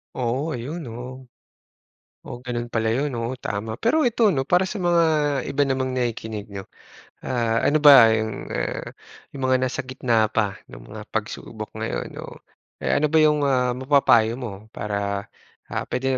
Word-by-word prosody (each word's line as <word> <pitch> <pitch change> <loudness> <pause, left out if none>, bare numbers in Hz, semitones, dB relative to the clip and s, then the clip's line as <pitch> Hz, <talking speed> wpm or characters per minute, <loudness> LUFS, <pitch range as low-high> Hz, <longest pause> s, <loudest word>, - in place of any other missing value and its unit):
Oo, 130 +6 -1
ayun, 135 +8 -5
oo. 125 +3 -8 1.0
Oh, - - -6
gano'n 120 -1 -3
pala 110 0 +1
'yon, 135 +4 0
oo, 120 +2 -3
tama. 110 -2 -4
Pero 275 +8 +3
ito 235 0 -2
'no, 135 - +1
para 180 +2 +4
sa 210 - -5
mga 175 -1 +3 0.4
iba 140 +1 0
namang 130 -1 0
nakikinig 110 -4 -3
'no, 100 -1 -7 0.6
ah, 115 -3 0
ano 155 - +3
ba 135 -6 +9
'yong, 110 0 0 0.2
ah, - - -2 0.5
'yong 140 - -8
mga 130 0 +4
nasa 130 - -1
gitna 120 -4 +1
pa 105 -2 -1
ng - - -12
mga - - -8
pagsubok - - -5
ngayon, - - -3
no? - - -10 0.4
Eh, - - 0
ano 150 - +3
ba 160 - +1
'yong 150 -1 +3
ah, 125 -2 +2
mapapayo 130 -4 +4
mo 110 -5 -7
para, 100 -1 -3 0.5
ah, - - -1
puwede 130 +1 -1
125 Hz, 165 wpm, -23 LUFS, 110-140 Hz, 1.0 s, ba